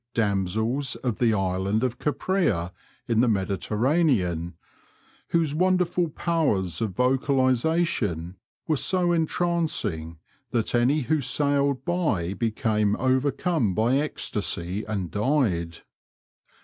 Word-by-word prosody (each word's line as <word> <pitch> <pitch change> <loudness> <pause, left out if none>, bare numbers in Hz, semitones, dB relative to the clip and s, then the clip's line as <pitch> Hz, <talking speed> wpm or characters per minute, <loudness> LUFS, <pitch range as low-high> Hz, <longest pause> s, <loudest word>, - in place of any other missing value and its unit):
damsels 110 +6 0
of 120 -4 -2
the 120 -2 +3
Island 95 +2 0
of 125 -2 -2
Caprea 150 - 0 0.4
in 115 -2 +1
the 125 - +4
Mediterranean, 100 - 0 0.8
whcse 165 -4 +1
wonderful 180 0 +1
powers 135 - -1
of 105 -5 -2
vocalisation 130 - +1 0.3
were 155 -2 +1
so 180 +3 +2
entrancing 160 - -1 0.3
that 115 -3 -1
any 125 +6 +3
who 150 +3 0
sailed 140 +1 +1
by 130 - 0
became 110 -2 0
overcome 130 - 0
by 115 +6 +2
ecstasy 100 - -2
and 100 -5 -3
died. 105 - 0
120 Hz, 100 wpm, -25 LUFS, 100-150 Hz, 0.8 s, the